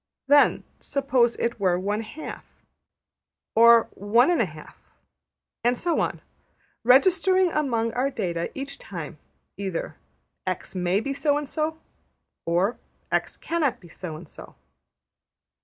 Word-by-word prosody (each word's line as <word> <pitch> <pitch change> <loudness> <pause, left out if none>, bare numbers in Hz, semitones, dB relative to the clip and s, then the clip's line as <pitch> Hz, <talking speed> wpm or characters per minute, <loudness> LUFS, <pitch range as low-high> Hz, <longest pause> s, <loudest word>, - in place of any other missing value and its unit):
Then, 285 +1 +5 0.2
suppose 260 -4 +1
it 235 -1 -2
were 185 -3 +2
one 205 +4 -1
half, 225 +8 -8 1.1
or 230 0 +7
one 230 - +3
and 345 - +2
a - - +1
half, - - -12 0.9
and 240 +1 +2
so 345 +3 0
on, - - -1 0.6
registering 370 +8 +4
among 235 -7 0
our 255 +3 +1
data, 170 -9 -2
each 275 +1 -6
time, 165 -4 -8 0.4
either 190 -4 -4 0.5
``$x$ 185 -1 -3
may 180 +2 +1
be 275 +4 -3
so 290 +1 +1
and 295 -1 -4
so,'' 315 +2 -2 0.7
or 180 +7 +1 0.3
``$x$ - - -1
cannot 320 -7 0
be 175 - -16
so 165 -1 -7
and 160 +2 -10
so.'' - - -13
235 Hz, 130 wpm, -25 LUFS, 190-285 Hz, 1.1 s, or